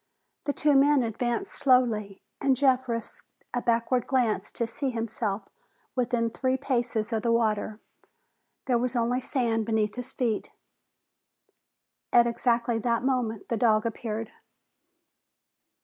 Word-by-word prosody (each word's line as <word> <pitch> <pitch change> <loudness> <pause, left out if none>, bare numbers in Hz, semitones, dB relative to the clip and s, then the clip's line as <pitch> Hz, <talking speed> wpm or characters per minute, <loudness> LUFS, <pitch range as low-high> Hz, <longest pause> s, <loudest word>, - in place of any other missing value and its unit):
The 285 - 0
two 295 0 +2
men 280 -1 +5
advanced 235 +1 -2
slowly, 230 -7 +2 0.2
and 265 -2 +3
Jeff 260 -2 +2
risked 230 -1 -5 0.2
a 245 - 0
backward 235 +1 +1
glance 245 -5 +1
to 235 - -1
see 265 +4 -2
himself 225 -4 -3 0.5
within 240 -2 0
three 260 +2 0
paces 240 -4 -1
of 220 - 0
the 235 - +1
water. 220 -2 0 0.9
There 245 -3 +2
was 250 +1 -1
only 245 +2 +1
sand 230 -4 0
beneath 215 -2 +1
his 250 +2 -7
feet. 230 -5 -1 1.6
At 240 0 +6
exactly 235 0 +1
that 235 +1 0
moment, 245 -5 -1
the 230 - 0
dog 215 -1 +3
appeared. 225 -1 -4
235 Hz, 130 wpm, -27 LUFS, 225-255 Hz, 1.6 s, At